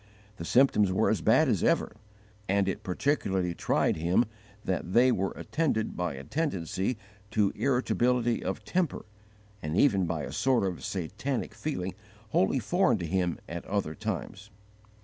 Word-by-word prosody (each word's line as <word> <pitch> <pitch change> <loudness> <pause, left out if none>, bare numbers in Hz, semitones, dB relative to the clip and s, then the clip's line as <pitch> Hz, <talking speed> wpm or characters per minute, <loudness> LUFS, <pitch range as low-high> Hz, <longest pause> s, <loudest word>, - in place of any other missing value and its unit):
The 85 - -6
symptoms 105 -4 +4
were 95 - +2
as - - 0
bad - - +4
as - - +1
ever, - - +1 0.5
and 100 0 +2
it 95 - -2
particularly 95 - 0
tried - - +1
him 85 +9 +2 0.4
that 90 -1 -2
they 125 +2 +6
were 95 -4 0
attended 140 -9 -1
by 90 -5 -2
a 70 - -8
tendency 100 - -2 0.3
to 105 -2 +2
irritability 125 -2 +1
of - - -4
temper, 180 -5 -1 0.6
and 75 +3 -2
even 100 -10 +4
by - - -2
a - - -5
sort 130 -5 +2
of 95 -3 -3
satanic 105 - -3
feeling 95 -12 -3 0.4
wholly 100 +4 +2
foreign 130 - +2
to 90 - -4
him 90 0 0
at 85 +1 -5
other 100 -6 -1
times. 105 +6 -5
100 Hz, 150 wpm, -29 LUFS, 90-125 Hz, 0.6 s, they